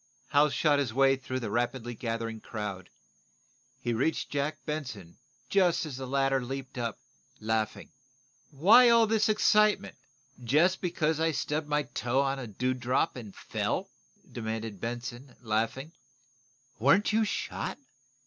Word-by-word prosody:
Hal 145 +1 +4
shot 145 0 +2
his 125 -5 -2
way 135 0 +5
through 130 -1 -5
the 110 -3 -4
rapidly 120 +1 -1
gathering 115 -1 -4
crowd. 100 -4 -6 0.9
He 120 -2 -2
reached 135 +8 -1
Jack 145 +1 -1
Benson 130 - -5 0.3
just 180 -4 +2
as 150 -4 -6
the 130 -1 -5
latter 135 0 +1
leaped 130 0 -6
up, 115 -3 -3 0.4
laughing. 110 0 -2 0.6
"Why 210 - +6
all 230 -1 +6
this 220 0 +2
excitement, 215 -3 +3 0.5
just 160 +10 +3
because 160 -3 0
I 165 0 +2
stubbed 150 +1 -2
my 150 0 +1
toe 130 +1 0
against 135 -1 -2
a - - -6
dew 130 0 +1
drop 125 +1 0
and 110 -6 -9
fell?" - - -3 0.4
demanded 110 -3 -5
Benson, 120 +2 -6
laughing. 115 +7 -1 0.9
"Weren't 160 - +4
you 220 +1 +3
shot?" 210 - -3
135 Hz, 140 wpm, -29 LUFS, 115-155 Hz, 0.9 s, Why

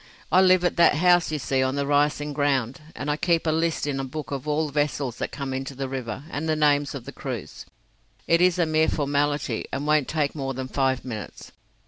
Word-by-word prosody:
I 185 - +6
live 185 -1 +5
at 175 - 0
that 170 -3 +5
house 175 +1 +4
you 155 - -1
see 135 -1 0
on 130 +1 0
the 140 0 -1
rising 145 +1 +1
ground, 135 -3 0
and 140 - -5
I 150 0 0
keep 170 0 +1
a 160 - +2
list 165 0 0
in 140 -2 -2
a - - -2
book 145 +2 -6
of 140 +1 -4
all 150 +1 0
vessels 145 -3 -1
that - - -3
come 135 -2 -4
into 135 +1 -4
the 135 0 -3
river, 130 -1 -5
and 160 +2 -3
the 155 - +2
names 145 -2 +2
of 125 -3 -7
the - - -7
crews. - - -7 0.6
It 170 +1 +3
is 180 0 +4
a 175 - +3
mere 155 0 +2
formality, 145 0 -1
and 140 +2 -3
won't 150 -2 +2
take 150 -3 0
more 135 -3 -4
than 130 0 -4
five 130 -2 0
minutes. 110 -5 -7
145 Hz, 225 wpm, -25 LUFS, 135-155 Hz, 0.6 s, I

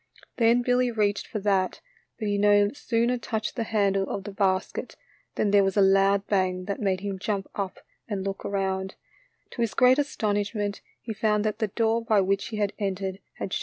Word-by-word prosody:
Then 235 +1 +4
Billy 250 0 +2
reached 210 -3 0
for - - -4
that, 195 -2 +1 0.4
but 215 - -3
he 205 0 0
no 205 0 +4
sooner 240 -2 0
touched 220 -1 -3
the 230 - -2
handle 200 -3 +1
of 195 - -3
the 205 - -6
basket 190 -1 -1 0.4
than 205 - +1
there 200 -1 +5
was 195 +1 0
a - - +6
loud 195 +1 +4
bang 185 -3 0
that 200 +4 -4
made 190 -2 0
him 200 -1 -4
jump 195 -1 -2
up 195 -2 -4 0.3
and 200 -3 -3
look 195 0 -4
around; 190 -1 -2 0.6
to 240 - -5
his 230 - -1
great 255 +1 +5
astonishment 205 -6 -1 0.2
he 225 - -6
found 210 -1 +1
that 215 - -1
the 220 - +1
door 225 +2 0
by 220 -3 +3
which 195 +1 +1
he 220 - -5
had 205 -1 0
entered 195 -1 -2
had 190 - -5
shut. - - 0
205 Hz, 200 wpm, -26 LUFS, 195-220 Hz, 0.6 s, a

